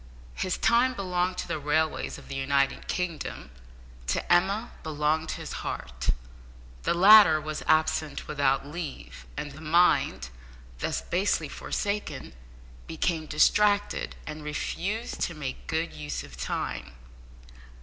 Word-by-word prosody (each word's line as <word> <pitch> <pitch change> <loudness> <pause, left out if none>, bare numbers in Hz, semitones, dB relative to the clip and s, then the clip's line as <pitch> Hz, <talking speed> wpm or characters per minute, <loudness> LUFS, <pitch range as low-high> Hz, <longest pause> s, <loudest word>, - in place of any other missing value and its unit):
His 185 - -1
time 250 +2 +3
belonged 180 -2 -1
to - - -3
the - - -2
railways 155 +2 0
of - - -13
the - - -6
United 140 0 +1
Kingdom; 170 - -3 0.6
to 65 - +1
Emma 200 +6 +2
belonged 155 +1 0
his - - -7
heart. 65 -1 -4 0.7
The - - +1
latter 195 -3 +8
was 155 0 -5
absent 155 -1 +1
without 140 -2 +1
leave, 145 - -7
and 145 - -4
the 145 +3 -11
mind, 160 - +3 0.5
thus - - -1
basely 180 -3 0
forsaken, 205 +7 -3 0.5
became 160 -1 -1
distracted, 205 +7 +3
and 155 0 -7
refused 190 +8 -3
to 170 - -1
make 140 -4 -6
good 160 +1 -1
use 75 -5 -5
of - - -12
time. 65 - -4
155 Hz, 125 wpm, -28 LUFS, 145-180 Hz, 0.7 s, latter